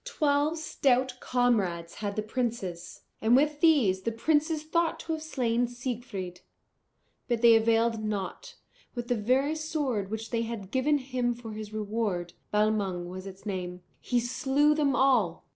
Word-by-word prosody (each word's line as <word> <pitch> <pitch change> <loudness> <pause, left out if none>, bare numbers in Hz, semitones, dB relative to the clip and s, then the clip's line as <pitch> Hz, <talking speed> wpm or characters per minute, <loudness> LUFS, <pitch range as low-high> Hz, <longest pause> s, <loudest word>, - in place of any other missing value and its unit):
Twelve 295 +2 +1
stout 260 -4 +1
comrades 200 -10 0
had 205 -1 -4
the 215 - -1
princes, 215 -7 -4 0.2
and 225 +2 +4
with 295 +2 +2
these 260 - +4
the 230 - -1
princes 305 +6 +1
thought 330 +1 0
to 325 - -5
have 315 - -4
slain 245 -6 0
Siegfried. 240 -7 -5 0.9
But 240 -2 -1
they 235 -1 +9
availed 225 0 +2
nought; 215 - -4 0.4
with 240 0 -5
the 245 - +2
very 255 +7 +2
sword 295 -10 -2
which 220 +1 -5
they 230 -1 0
had 225 -4 -5
given 285 +3 +2
him 255 -3 -1
for 230 -2 -9
his 215 0 -7
reward 210 -5 -2 0.2
Balmung 205 -4 0
was 185 +1 -7
its 195 +1 -11
name 180 -3 -4 0.2
he 245 - 0
slew 270 +5 +2
them 290 -3 +1
all. 240 -12 +2
235 Hz, 155 wpm, -28 LUFS, 210-275 Hz, 0.9 s, they